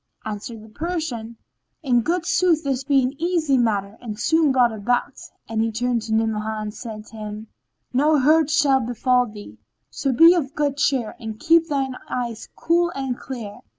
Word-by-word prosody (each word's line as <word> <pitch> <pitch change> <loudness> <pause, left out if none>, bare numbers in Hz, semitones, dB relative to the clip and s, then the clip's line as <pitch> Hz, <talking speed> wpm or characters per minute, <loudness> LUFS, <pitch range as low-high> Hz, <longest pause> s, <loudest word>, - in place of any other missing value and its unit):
Answered 215 +1 -6
the 220 - -14
Persian, 255 -6 -4 0.5
"In 245 -4 +3
good 340 +7 -1
sooth 350 -3 +2
this 270 -2 -1
be 275 -1 +3
an 255 +2 -1
easy 335 -5 +1
matter 210 -4 0
and 220 -3 -7
soon 320 0 +3
brought 250 -3 +4
about," 240 +3 -1 0.3
and 225 -1 -1
he 225 0 0
turned 240 +1 -1
to 220 0 -4
Ni'amah 220 -1 -1
and 210 -1 -5
said 215 -2 -8
to 225 - -13
him, 215 0 -7 0.4
"No 300 +4 +3
hurt 305 +2 +4
shall 295 -4 +3
befall 250 +1 +1
thee; 205 - -11 0.3
so 275 - -1
be 330 +7 +7
of 290 -6 -2
good 285 -2 0
cheer 265 -6 0
and 220 -1 -7
keep 330 0 +4
thine 270 -4 -2
eyes 235 -3 -4
cool 345 +1 +2
and 265 -2 -2
clear." 230 -6 -8
250 Hz, 180 wpm, -22 LUFS, 220-295 Hz, 0.5 s, be